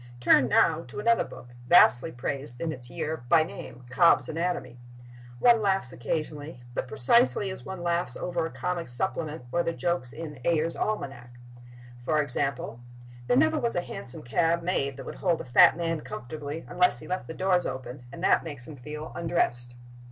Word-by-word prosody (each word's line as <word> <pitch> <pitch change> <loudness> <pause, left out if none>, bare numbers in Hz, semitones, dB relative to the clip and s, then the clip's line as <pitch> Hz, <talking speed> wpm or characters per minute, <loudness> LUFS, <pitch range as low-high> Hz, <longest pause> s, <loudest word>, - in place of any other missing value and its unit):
Turn, 125 +1 +5
now, 160 +5 +3
to 125 - -8
another 230 +2 +3
book, 120 - -12 0.2
vastly 125 +6 +6
praised 125 0 -3
in 165 -1 -2
its 125 -4 -10
year—by 160 -2 +1
name, 125 -5 -10
"Cobb's 170 +6 +4
Anatomy." 160 -7 -3 0.6
One 235 - +5
laughs 195 - 0
occasionally—but 145 -2 -5
precisely 200 - +3
as 190 - -9
one 190 -2 -7
laughs 175 0 -1
over 175 -2 -2
a 165 - -3
comic 175 -5 -4
supplement 155 +2 -2
or 175 - +1
the 170 0 -2
jokes 135 -2 -2
in 150 -4 -8
Ayer's 165 +1 +1
Almanac. 130 - -4 0.7
For 155 +4 +1
example: 135 -3 +1 0.5
There 245 - +3
never 315 +2 +3
was 235 -4 -1
a 175 - +1
hansom 130 -7 -5
cab 165 +7 +1
made 140 -7 -1
that - - -9
would - - -7
hold 175 -4 +1
a - - -7
fat 125 +5 +6
man 165 -2 -2
comfortably 145 +5 -7
unless 180 +1 +3
he - - -8
left 185 0 -3
the 160 - -7
doors 185 -1 +1
open, 130 -1 -7
and - - -9
that - - +3
makes 145 -6 -5
him 155 - -9
feel 150 +4 -8
undressed. 120 -8 0
155 Hz, 175 wpm, -27 LUFS, 125-175 Hz, 0.7 s, vastly